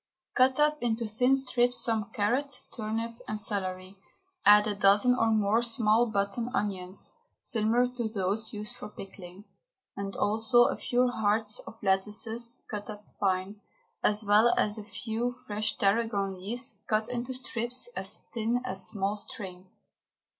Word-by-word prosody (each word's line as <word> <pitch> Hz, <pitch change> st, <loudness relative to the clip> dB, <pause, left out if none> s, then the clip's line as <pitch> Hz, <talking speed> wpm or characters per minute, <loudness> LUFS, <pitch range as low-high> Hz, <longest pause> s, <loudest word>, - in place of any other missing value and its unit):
Cut 260 Hz, +2 st, +3 dB
up 300 Hz, 0 st, +3 dB
into 230 Hz, -1 st, 0 dB
thin 250 Hz, +5 st, +3 dB
strips 245 Hz, -2 st, +1 dB
some 225 Hz, -3 st, 0 dB
carrot, 250 Hz, +5 st, -1 dB
turnip 225 Hz, +1 st, -4 dB
and 215 Hz, -, -3 dB
celery, 190 Hz, -2 st, -4 dB, 0.5 s
add 210 Hz, 0 st, +7 dB
a 210 Hz, -, 0 dB
dozen 205 Hz, +5 st, +4 dB
or 225 Hz, -2 st, +2 dB
more 215 Hz, +1 st, +3 dB
small 230 Hz, 0 st, +2 dB
button 210 Hz, +3 st, -1 dB
onions, 190 Hz, -2 st, 0 dB, 0.2 s
similar 230 Hz, +2 st, +1 dB
to 245 Hz, -2 st, -3 dB
those 205 Hz, +1 st, -1 dB
used 210 Hz, +3 st, -5 dB
for 250 Hz, -, -8 dB
pickling, 195 Hz, -1 st, -11 dB, 0.5 s
and 200 Hz, 0 st, -5 dB
also 225 Hz, +3 st, +4 dB
a -, -, +1 dB
few 250 Hz, +1 st, +1 dB
hearts 215 Hz, -2 st, 0 dB
of 225 Hz, -, -10 dB
lettuces 220 Hz, +5 st, 0 dB
cut 210 Hz, 0 st, -6 dB
up 210 Hz, -1 st, -8 dB
fine, 195 Hz, +1 st, -1 dB, 0.4 s
as 210 Hz, +1 st, +3 dB
well 210 Hz, +4 st, +5 dB
as 210 Hz, +1 st, +1 dB
a -, -, -7 dB
few 230 Hz, +3 st, -3 dB
fresh 215 Hz, +1 st, -2 dB
tarragon 200 Hz, -1 st, +1 dB
leaves 235 Hz, +8 st, -4 dB
cut 215 Hz, 0 st, +1 dB
into 245 Hz, +1 st, -3 dB
strips 250 Hz, -, -1 dB
as -, -, -3 dB, 0.2 s
thin 235 Hz, +1 st, 0 dB
as 190 Hz, -6 st, +1 dB
small 200 Hz, +1 st, -1 dB
string. 190 Hz, -4 st, -6 dB
215 Hz, 145 wpm, -29 LUFS, 205-240 Hz, 0.5 s, add